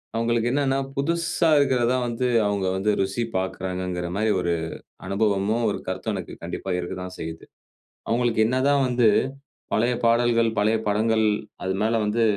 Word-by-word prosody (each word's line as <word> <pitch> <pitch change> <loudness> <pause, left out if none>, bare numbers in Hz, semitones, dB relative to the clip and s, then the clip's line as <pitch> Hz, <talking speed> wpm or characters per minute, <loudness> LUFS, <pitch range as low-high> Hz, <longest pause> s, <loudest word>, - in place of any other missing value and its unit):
அவங்களுக்கு 115 +1 +1
என்னனா, 135 -1 +1 0.2
புதுசா 165 +3 +1
இருக்குறது 130 -4 +2
தான் 125 -1 0
வந்து, 120 +2 -1 0.2
அவங்க 100 -2 -1
வந்து 105 +2 +1
ருசி 95 +5 -1
பாக்குறாங்குற 90 -1 -3
மாரி 110 0 +2
ஒரு 85 -1 0 0.5
அனுபவமும், 105 +3 +1
ஒரு - - -3
கருத்தும் 95 +3 -2
எனக்கு 90 - -6
கண்டிப்பா 95 - -5
இருக்கத்தான் 90 +1 -5
செய்யுது. 80 0 -6 0.7
அவங்களுக்கு 115 -1 +2
என்ன 130 +2 0
தான் 140 -1 +3
வந்து, 120 -3 +3 0.6
பழைய 120 +3 +2
பாடல்கள், 115 0 +3
பழைய 110 +2 +3
படங்கள் 110 +1 +2 0.4
அதுனால 105 +4 0
வந்து, 115 +2 +1
110 Hz, 140 wpm, -24 LUFS, 95-120 Hz, 0.7 s, தான்